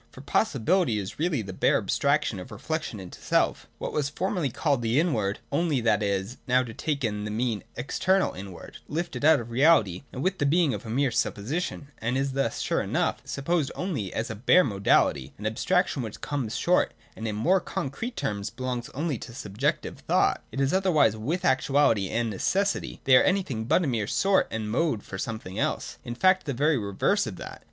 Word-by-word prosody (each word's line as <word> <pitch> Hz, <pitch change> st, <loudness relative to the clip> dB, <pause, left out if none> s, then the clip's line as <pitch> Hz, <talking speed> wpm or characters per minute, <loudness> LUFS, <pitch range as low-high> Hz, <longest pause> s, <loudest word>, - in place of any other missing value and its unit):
For 130 Hz, -, -12 dB
Possi 140 Hz, -, 0 dB
bility 175 Hz, -, +3 dB
is 95 Hz, +5 st, -6 dB
really 155 Hz, -8 st, 0 dB
the 95 Hz, -1 st, -7 dB
bare -, -, +3 dB
abstraction 140 Hz, -7 st, +1 dB
of 90 Hz, -, -9 dB
reflection 160 Hz, -9 st, -4 dB
into 90 Hz, -2 st, -10 dB
self, -, -, +1 dB
— -, -, -37 dB
what -, -, -5 dB
was 145 Hz, -2 st, 0 dB
formerly 180 Hz, -1 st, -1 dB
called 140 Hz, +1 st, 0 dB
the 115 Hz, +4 st, +2 dB
Inward, 110 Hz, -, 0 dB
only 150 Hz, -2 st, +1 dB
that 110 Hz, -2 st, +2 dB
it 100 Hz, -, +1 dB
is 100 Hz, +5 st, -2 dB
now 130 Hz, 0 st, +4 dB
taken 115 Hz, -3 st, -2 dB
to 105 Hz, -, -4 dB
mean 110 Hz, 0 st, -1 dB
the 120 Hz, -, -9 dB
external 190 Hz, +8 st, +1 dB
inward, 95 Hz, -2 st, -9 dB
lifted 150 Hz, -5 st, -3 dB
out 155 Hz, -1 st, +6 dB
of 120 Hz, 0 st, -8 dB
reality 120 Hz, -, +4 dB
and 130 Hz, -, -5 dB
with 190 Hz, 0 st, 0 dB
the 145 Hz, -, +2 dB
being 160 Hz, -2 st, +3 dB
of 120 Hz, -, -6 dB
a -, -, -6 dB
mere 130 Hz, +3 st, +1 dB
supposition, 130 Hz, -, -2 dB
and 120 Hz, +3 st, -1 dB
is 135 Hz, 0 st, 0 dB
thus, 135 Hz, -4 st, -1 dB
sure -, -, 0 dB
enough, -, -, -1 dB
supposed 145 Hz, +1 st, -1 dB
only 150 Hz, -, -3 dB
as 110 Hz, +1 st, -3 dB
a -, -, -4 dB
bare 145 Hz, -, +5 dB
modality, 95 Hz, -, +1 dB
an 105 Hz, -, -8 dB
abstraction 140 Hz, +7 st, +1 dB
which 110 Hz, -3 st, -6 dB
comes 130 Hz, -6 st, -3 dB
short, 180 Hz, +1 st, +2 dB, 0.2 s
and, 110 Hz, -, -5 dB
in 105 Hz, -, -2 dB
more 175 Hz, -, +3 dB
con 140 Hz, -5 st, -4 dB
crete 235 Hz, -, -5 dB
terms, 100 Hz, -1 st, -2 dB
belongs 125 Hz, -1 st, -4 dB
only 145 Hz, -4 st, -1 dB
to 115 Hz, -, -9 dB
subjective 125 Hz, +4 st, -2 dB
thought. -, -, +2 dB
It 135 Hz, -, -5 dB
is 135 Hz, 0 st, +1 dB
otherwise 185 Hz, -, +3 dB
with 155 Hz, +12 st, -2 dB
Actuality 130 Hz, -, +3 dB
and 115 Hz, +1 st, 0 dB
Necessity. 195 Hz, -, -1 dB
They 130 Hz, -1 st, +7 dB
are -, -, +5 dB
anything 165 Hz, -, 0 dB
but 160 Hz, +8 st, +3 dB
a -, -, 0 dB
mere 115 Hz, -6 st, -1 dB
sort 195 Hz, -, +2 dB
and 110 Hz, -1 st, -3 dB
mode 130 Hz, -3 st, 0 dB
for 95 Hz, -, -7 dB
something 110 Hz, -4 st, -5 dB
else: -, -, -2 dB
in 120 Hz, -, -5 dB
fact 185 Hz, +5 st, +3 dB
the 140 Hz, -, -1 dB
very 145 Hz, +1 st, +2 dB
reverse 100 Hz, -2 st, +1 dB
of -, -, -5 dB
that. -, -, -9 dB
130 Hz, 205 wpm, -27 LUFS, 110-155 Hz, 0.2 s, They